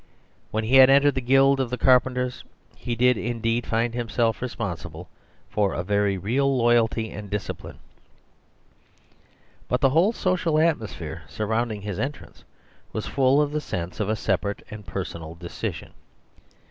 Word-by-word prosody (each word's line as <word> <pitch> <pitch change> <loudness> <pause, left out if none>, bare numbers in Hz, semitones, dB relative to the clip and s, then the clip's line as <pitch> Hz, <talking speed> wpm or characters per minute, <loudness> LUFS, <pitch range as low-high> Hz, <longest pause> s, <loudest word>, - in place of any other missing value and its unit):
When 110 +1 -2
he 125 +5 +4
had 130 0 +9
entered 140 +1 +5
the 130 - -2
guild 135 +2 +4
of 130 -3 0
the 125 - -3
carpenters 125 -1 +2 0.3
he 120 - -4
did 125 +1 +3
indeed 115 +1 -1
find 115 +1 0
himself 115 -2 -1
responsible 90 -9 -5 0.4
for 100 -2 0
a 85 - -2
very 100 0 +1
real 130 +8 +1
loyalty 115 -2 +2
and 105 -1 -8
disci 105 +1 -3
pline; - - -12 1.9
but 125 - 0
the 135 0 +3
whole 170 +9 +4
social 180 -7 0
atmosphere 110 - -1
sur 110 - -3
rounding 110 -1 -1
his 105 -3 -4
entrance 140 +2 -6 0.5
was - - -4
full 135 +1 +3
of 145 - -3
the 150 0 -2
sense 90 - -5
of 105 -1 -1
a 110 - +1
separate 100 -1 -2
and 105 -3 -9
personal 85 -2 -6
decision. 85 0 -6
115 Hz, 155 wpm, -24 LUFS, 100-130 Hz, 1.9 s, had